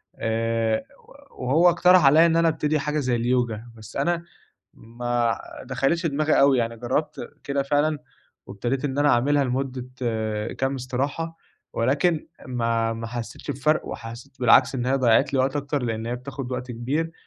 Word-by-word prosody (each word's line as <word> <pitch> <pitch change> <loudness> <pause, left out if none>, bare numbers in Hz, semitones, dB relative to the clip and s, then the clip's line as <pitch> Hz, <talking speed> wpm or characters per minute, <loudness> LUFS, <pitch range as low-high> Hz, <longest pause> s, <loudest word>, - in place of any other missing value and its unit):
آآ 115 0 0 0.5
وهو 150 +8 +3
اقترح 180 -1 +5
علىَّ 155 +4 +7
إن 165 -1 +2
أنا 165 0 +4
أبتدي 155 -1 +1
حاجة 150 +2 -1
زي 125 -3 0
الYoga، 120 -2 0 0.2
بس 110 -2 -13
أنا 170 +4 0 0.5
ما 120 0 -2 0.3
دخلِتش 135 +7 0
دماغي 155 +1 +2
أوي، 140 -2 +5
يعني 115 -1 -1
جربت 125 +6 -3
كده 140 0 0
فعلًا، 145 +2 +1 0.5
وابتديت 125 +6 -3
إن 140 0 -2
أنا 145 - +4
أعملها 140 +4 +3
لمدة 130 0 -3 0.7
كام 135 +1 0
استراحة، 140 +6 -3 0.4
ولكن 150 +7 +1 0.2
ما 115 -2 0
ما 115 0 -5
حسيتش 120 +4 -6
بفرق 150 +3 0
وحسيت 120 +4 -9
بالعكس 125 +2 +5
إن 125 -1 -2
هي 130 - +2
ضيعت 130 +2 +3
لي - - +2
وقت 135 +2 0
أكتر 140 -1 -2
لأن 115 -1 -3
هي 120 +1 -2
بتاخد 130 0 -7
وقت 125 0 -4
كبير، 140 +8 -2
130 Hz, 155 wpm, -24 LUFS, 120-145 Hz, 0.7 s, علىَّ